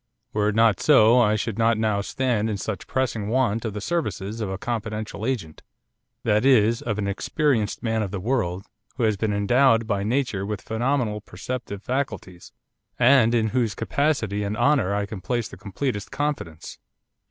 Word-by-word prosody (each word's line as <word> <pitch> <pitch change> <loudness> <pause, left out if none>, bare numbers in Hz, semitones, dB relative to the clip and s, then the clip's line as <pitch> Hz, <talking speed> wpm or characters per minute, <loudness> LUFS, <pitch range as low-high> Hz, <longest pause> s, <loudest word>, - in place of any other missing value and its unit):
Were 105 0 +2
it 105 - -2
not 115 -4 +4
so 125 -5 +6
I 110 -3 +4
should 110 0 -3
not 115 0 +3
now 110 -2 +1
stand 115 -2 -1
in 105 - -2
such 100 -2 -5
pressing 120 -6 -1
want 115 -2 +1
of 110 - -3
the 105 - -4
services 115 - -3
of 105 - -2
a 95 - -3
confidential 110 0 -4
agent, 105 -13 -3 0.6
that 105 +2 +2
is, 115 -3 +4
of 110 -3 -2
an 100 -1 -1
experienced 115 +2 0
man 115 -1 0
of 105 - -2
the 100 0 -4
world, 95 -4 -1 0.3
who 125 - -2
has 110 -2 +3
been 105 +1 -1
endowed 115 +3 +3
by 100 -3 -1
nature 115 -3 -1
with 105 0 -4
phenomenal 115 -2 -1
perceptive 105 +1 -6
faculties, 105 -9 -4 0.5
and 120 -2 +5
in 110 -2 +2
whose 115 -4 0
capacity 125 -9 0
and 105 +1 -2
honour 135 -10 +2
I 100 0 0
can 100 -2 -8
place 120 +3 -1
the - - -11
completest 105 +3 -4
confidence. 140 - -4
110 Hz, 175 wpm, -24 LUFS, 100-125 Hz, 0.6 s, so